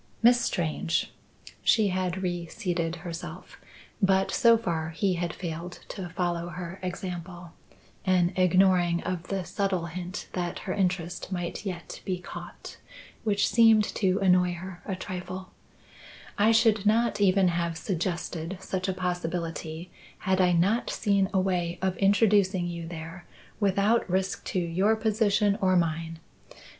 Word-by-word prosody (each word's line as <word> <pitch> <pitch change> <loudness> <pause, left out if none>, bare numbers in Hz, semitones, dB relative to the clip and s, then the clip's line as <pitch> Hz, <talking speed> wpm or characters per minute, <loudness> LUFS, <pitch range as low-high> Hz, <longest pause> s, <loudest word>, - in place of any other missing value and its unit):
"Miss 240 +1 +6
Strange" 165 -2 -1 0.5
she 215 -3 +4
had 185 0 -2
reseated 175 -1 -2
herself, 170 -1 -8 0.4
but 190 -1 +3
so 230 -1 +5
far 165 -8 -2
he 185 +4 0
had 170 -1 -2
failed 170 +1 -6
to 190 -4 -6
follow 175 0 -2
her 175 +2 -7
example 180 -1 -6 0.5
(an 185 -1 +2
ignoring 180 -1 +3
of 180 -1 -3
the 195 -2 -2
subtle 190 -3 -1
hint 180 +3 -6
that 175 -1 -2
her 185 - -1
interest 180 -2 -1
might 175 +2 -4
yet 175 -3 -6
be 185 -1 -2
caught, 175 - -9 0.5
which 205 -2 +2
seemed 225 -2 +6
to 190 -2 0
annoy 180 -1 +4
her 180 0 -8
a 195 - -1
trifle), 185 0 -6 0.8
"I 215 +2 +4
should 225 -2 +4
not 220 -1 +2
even 190 -1 +4
have 170 -1 -1
suggested 175 -1 -3
such 185 0 -3
a 190 - 0
possibility 175 -2 -3 0.3
had 190 0 +1
I 180 -1 +4
not 190 +8 +2
seen 200 -2 +1
a 190 - +2
way 180 -2 0
of 190 -1 0
introducing 195 -2 +3
you 170 -1 -5
there 165 +2 -8 0.3
without 200 +2 +2
risk 190 +1 -1
to 185 - -1
your 185 +5 +2
position 210 -2 +2
or 185 -1 +3
mine. 165 -1 0
185 Hz, 140 wpm, -27 LUFS, 175-195 Hz, 0.8 s, Miss